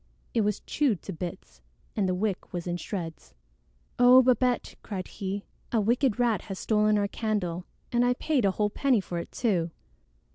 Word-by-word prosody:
It 230 - +3
was 210 -1 0
chewed 265 - 0
to 195 - -5
bits, 165 - -7 0.3
and 195 -4 +1
the 180 - +1
wick 195 0 -2
was 175 -2 -4
in 175 -1 -2
shreds. 165 - -6 0.6
"Oh, 250 +1 +8
Babette!" 250 0 +2
cried 190 -3 -5
he. 195 +1 -4 0.3
"A 230 - +3
wicked 235 +2 +2
rat 235 -6 +2
has 195 - -5
stolen 210 +1 +2
our 205 -1 +1
candle, 195 -5 -2 0.3
and 240 0 +3
I 245 0 +3
paid 285 -2 +1
a 200 - +4
whole 210 +2 0
penny 260 0 +2
for 175 -3 -4
it - - -7
too!" 185 -8 +1
210 Hz, 180 wpm, -28 LUFS, 185-240 Hz, 0.6 s, Oh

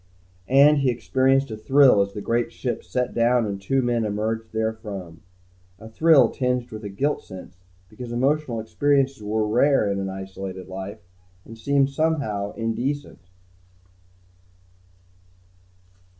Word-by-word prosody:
And 140 +3 +5
he 135 -2 +2
experienced 130 +2 +1
a - - -4
thrill 130 -1 +5
as 100 0 -2
the 105 - -6
great 120 +2 0
ship 125 - -4
set 125 -1 -2
down 120 0 +2
and 100 -2 -4
two 135 +7 0
men 120 -1 0
emerged 110 +2 -2
therefrom. 105 -7 -5 0.6
A 110 - -12
thrill 155 +6 +4
tinged 125 -2 -2
with 110 0 -8
a 100 - -5
guilt 140 +10 -1
sense, 90 -2 -12 0.3
because 115 +3 -9
emotional 130 0 0
experiences 135 +3 0
were 105 +1 -1
rare 125 +1 +3
in 100 - -2
an 95 0 -3
isolated 95 0 -7
life 95 +1 -7 0.5
and 115 - -11
seemed 140 +4 +1
somehow 135 -10 -1
indecent. 120 -1 -4
115 Hz, 135 wpm, -23 LUFS, 105-135 Hz, 0.6 s, And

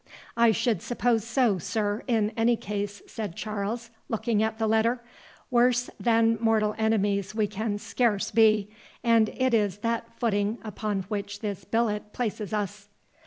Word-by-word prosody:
"I 235 0 +5
should 225 +1 0
suppose 240 -2 +1
so, 235 -4 +2
sir, 205 +4 -1
in 220 -4 +2
any 235 +1 +3
case," 205 -1 -4
said 205 -6 -6
Charles, 215 +2 -4 0.2
looking 225 -1 0
at 220 0 0
the 220 - 0
letter; 225 +3 +2 0.5
"worse 245 0 +3
than 230 -1 +3
mortal 220 -2 +2
enemies 205 -2 +1
we 215 -2 +2
can 210 +1 -2
scarce 210 -1 0
be, 215 -2 +4 0.3
and 230 -2 +4
it 260 -1 +2
is 205 -4 +2
that 230 0 0
footing 210 -1 0
upon 210 -2 -3
which 205 +1 -5
this 200 -4 -4
billet 210 -2 -1
places 215 -4 -3
us." 205 -1 -3
220 Hz, 150 wpm, -27 LUFS, 205-230 Hz, 0.5 s, I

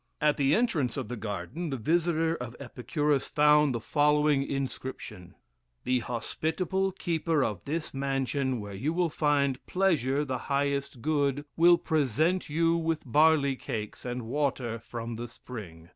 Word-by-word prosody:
At 150 0 +2
the 140 +1 +3
entrance 165 - +1
of 130 -5 -4
the 125 - -3
garden, 115 - -4
the 135 - -2
visitor 165 +4 +1
of 125 -5 -7
Epicurus 140 +2 -1
found 150 -1 +4
the - - -1
following 150 +2 +3
inscription: 130 -8 -5 0.5
"The 125 0 +2
hospitable 160 +10 -2
keeper 165 -5 0
of 105 -7 -3
this 155 +3 -3
mansion, 135 -1 -1
where 100 -1 -7
you 135 +12 -2
will 175 -2 +1
find 140 -4 +1
pleasure 150 -7 +1
the 130 -3 -3
highest 140 -3 -1
good, 145 -2 +1
will 170 +1 +6
present 160 - +1
you 165 +2 +2
with 165 -1 -1
barley 145 +1 +4
cakes 105 -4 -5
and 125 0 -4
water 125 -2 -1
from 115 0 -6
the 120 +1 -5
spring. 90 -9 -10
140 Hz, 145 wpm, -29 LUFS, 125-160 Hz, 0.5 s, will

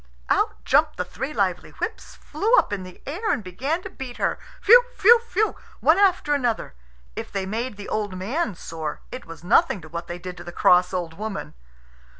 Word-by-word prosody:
Out - - +1
jumped - - +3
the - - -1
three 270 +3 -5
lively - - -1
whips, - - -5
flew 450 +4 +1
up - - +3
in 200 - -2
the 185 -1 -11
air, 355 +11 -2
and 220 - -1
began 270 - -2
to 385 - -6
beat 260 -7 -8
her - - 0 0.2
phew! 485 +4 +8
phew! 465 +4 +7
phew! 435 +2 +1 0.2
one 330 +5 +4
after 365 -7 +3
another. 245 - -1 0.4
If - - -6
they 195 -1 -2
made 225 +3 -3
the 205 - -8
old 205 -3 -2
man 225 - -2
sore, 160 -3 -6
it 255 - -8
was 165 0 -10
nothing 240 - +3
to 160 - -12
what 170 +1 -6
they 175 - -5
did 180 0 -8
to 175 - -8
the 175 - -8
cross 180 +1 +4
old 175 -3 -3
woman. 215 -2 -5
215 Hz, 200 wpm, -24 LUFS, -, 0.4 s, phew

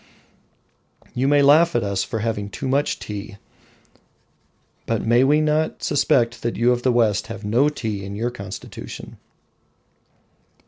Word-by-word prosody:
You 130 +2 0
may 145 0 +4
laugh 155 +3 +5
at 120 - +2
us 100 -2 -1
for 120 - -4
having 105 -3 -2
"too 135 +7 -5
much 140 +3 +1
tea," 100 -1 -7 1.5
but 115 -2 -1
may 120 +3 +4
we 150 +3 +4
not 155 +1 0
suspect 120 -4 +1
that 115 - -2
you 120 +2 +3
of 120 0 0
the 130 - +2
West 115 -5 +1
have 100 - -7
"no 120 +8 +3
tea" 110 -9 -4
in 100 +1 -6
your 120 +4 -2
constitution? 100 -5 -9
120 Hz, 145 wpm, -22 LUFS, 105-140 Hz, 1.5 s, laugh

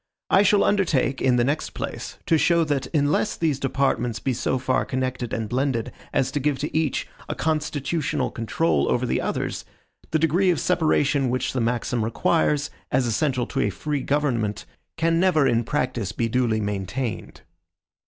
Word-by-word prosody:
I 195 - +6
shall 205 0 +4
undertake, 150 - +1
in 125 -2 +3
the 120 - +3
next 145 +5 -2
place, - - -5
to 165 - +3
show 170 +1 +3
that 145 -4 -1
unless 150 +7 +1
these 155 -5 0
departments 135 -4 0
be 130 - -1
so 130 - 0
far 130 0 +1
connected 130 -2 -3
and 110 -1 -2
blended 125 0 -1 0.2
as 130 0 +1
to 145 - -1
give 145 0 0
to 145 +3 -4
each 160 -3 0 0.2
a - - -2
constitutional 150 -2 -1
control 120 +8 0
over 125 - +1
the 120 - 0
others, - - -2 0.5
the 160 - +2
degree 165 +4 +2
of 170 - +2
separation 150 -6 +2
which 130 +1 -1
the 130 - 0
maxim 120 0 0
requires, 145 +3 +1 0.2
as 130 0 +2
essential 125 +2 0
to - - -4
a - - +2
free 145 +7 -3
government, 125 -8 -1 0.3
can 165 0 +2
never 175 -6 +3
in 120 -3 +2
practice 125 -5 -1
be 115 +1 0
duly 115 -2 +1
maintained. 105 +4 -4
135 Hz, 170 wpm, -24 LUFS, 120-155 Hz, 0.5 s, I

